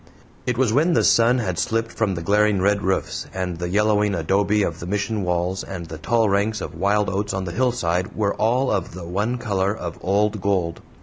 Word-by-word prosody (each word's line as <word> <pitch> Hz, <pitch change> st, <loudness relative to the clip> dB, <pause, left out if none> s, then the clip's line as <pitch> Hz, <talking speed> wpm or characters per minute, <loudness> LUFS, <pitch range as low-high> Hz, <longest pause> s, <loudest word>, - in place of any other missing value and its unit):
It 125 Hz, -1 st, 0 dB
was 125 Hz, -4 st, +2 dB
when 160 Hz, +7 st, +3 dB
the -, -, +3 dB
sun 120 Hz, +2 st, +4 dB
had 95 Hz, -8 st, -2 dB
slipped 115 Hz, 0 st, -1 dB
from 105 Hz, -4 st, -1 dB
the 85 Hz, -, -5 dB
glaring 105 Hz, +2 st, +3 dB
red 100 Hz, +2 st, +2 dB
roofs, 95 Hz, -1 st, -1 dB
and 90 Hz, -2 st, -3 dB
the 90 Hz, 0 st, -3 dB
yellowing 105 Hz, +1 st, +2 dB
adobe 100 Hz, +5 st, +1 dB
of -, -, -3 dB
the 85 Hz, -, -6 dB
Mission 105 Hz, +2 st, -1 dB
walls 90 Hz, +1 st, -1 dB
and 90 Hz, -3 st, -6 dB
the 80 Hz, -1 st, -8 dB
tall 115 Hz, +4 st, +2 dB
ranks 100 Hz, +2 st, +1 dB
of 80 Hz, -, -6 dB
wild 100 Hz, +5 st, +1 dB
oats 100 Hz, +2 st, -2 dB
on 95 Hz, -, -2 dB
the 90 Hz, -, -4 dB
hillside 90 Hz, -6 st, 0 dB
were 100 Hz, -2 st, 0 dB
all 125 Hz, +5 st, +1 dB
of 90 Hz, -3 st, -2 dB
the 90 Hz, -2 st, -7 dB
one 105 Hz, +8 st, -1 dB
color 100 Hz, -3 st, -1 dB
of 85 Hz, -2 st, -6 dB
old 105 Hz, +2 st, +1 dB
gold. 90 Hz, -4 st, -1 dB
100 Hz, 210 wpm, -22 LUFS, 90-110 Hz, -, sun